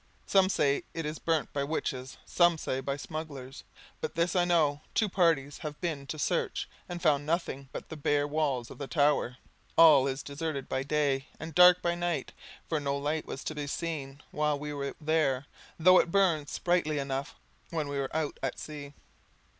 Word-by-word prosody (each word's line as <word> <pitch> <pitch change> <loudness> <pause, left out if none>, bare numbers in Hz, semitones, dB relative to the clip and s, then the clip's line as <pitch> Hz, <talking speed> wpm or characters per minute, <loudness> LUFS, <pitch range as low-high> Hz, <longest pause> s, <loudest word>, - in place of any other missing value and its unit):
Some 190 -1 +4
say 145 -6 +2
it 165 -1 -3
is 150 +1 -4
burnt 160 -3 0
by 140 - 0
witches, 135 -3 -3
some 175 -1 +4
say 130 -3 -2
by 140 +1 -3
smugglers; 145 -4 -7 0.4
but - - -4
this 170 +2 +1
I 175 -1 +4
know, 155 -5 +2
two 220 - +3
parties 165 -7 +1
have 150 -2 -6
been 155 -6 -3
to 155 - -4
search, 145 - -1 0.2
and 175 0 -4
found 150 -5 +3
nothing 155 -5 -2
but - - -7
the 160 - -6
bare 145 -1 +1
walls 145 -5 -1
of - - -11
the 140 - -4
tower. 145 -5 +2 0.4
All 150 -5 +8
is 135 +1 -3
deserted 145 -1 -4
by 130 - -1
day, 140 -1 0
and 160 +1 -7
dark 180 +2 +7
by 170 - +2
night; 175 -1 -2 0.3
for 160 - 0
no 140 -1 -1
light 150 +2 -2
was 135 - -6
to - - -3
be 145 -1 -4
seen 140 -3 -4
while 150 -1 +1
we 150 +1 -5
were 140 -1 -4
there, 150 -4 +1 0.3
though 185 +3 +7
it - - +1
burned 170 -6 +2
sprightly 175 -4 0
enough 135 0 -3 0.3
when 160 -3 -2
we 140 0 -3
were 135 -1 -2
out 155 -2 -2
at 135 - -2
sea. 145 -2 -8
150 Hz, 190 wpm, -30 LUFS, 140-165 Hz, 0.4 s, All